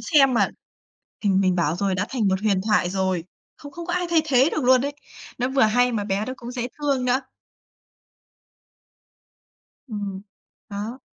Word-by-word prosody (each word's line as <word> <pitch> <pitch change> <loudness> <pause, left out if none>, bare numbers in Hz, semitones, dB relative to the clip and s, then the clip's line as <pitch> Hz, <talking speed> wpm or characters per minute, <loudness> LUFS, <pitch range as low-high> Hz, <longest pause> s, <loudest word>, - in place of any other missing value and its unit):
xem 275 -5 +4
mà. - - +3 0.7
Thì 205 - +1
mình 190 -1 +3
bảo 170 -3 +1
rồi 190 0 0
đã 195 - -1
thành 235 -6 0
một 190 0 +1
huyền 200 -3 +2
thoại 210 -3 +2
rồi, 190 -3 -1 0.3
không 285 - -11
không 340 +3 -8
có 350 - -3
ai 360 0 0
thay 330 -2 +4
thế 270 -1 +4
được 310 - -1
luôn 255 0 +5
ấy. 285 - -2 0.5
Nó 250 - 0
vừa 265 0 +1
hay 245 +3 +3
mà 215 -3 -1
bé 200 +1 -1
đó 255 - -4
cũng 240 +1 -8
dễ 245 -1 -3
thương 280 -4 0
nữa. 250 +1 +2 2.7
Ừm, 205 -4 -4 0.5
đó. 215 +5 -5
230 Hz, 180 wpm, -23 LUFS, 195-265 Hz, 2.7 s, luôn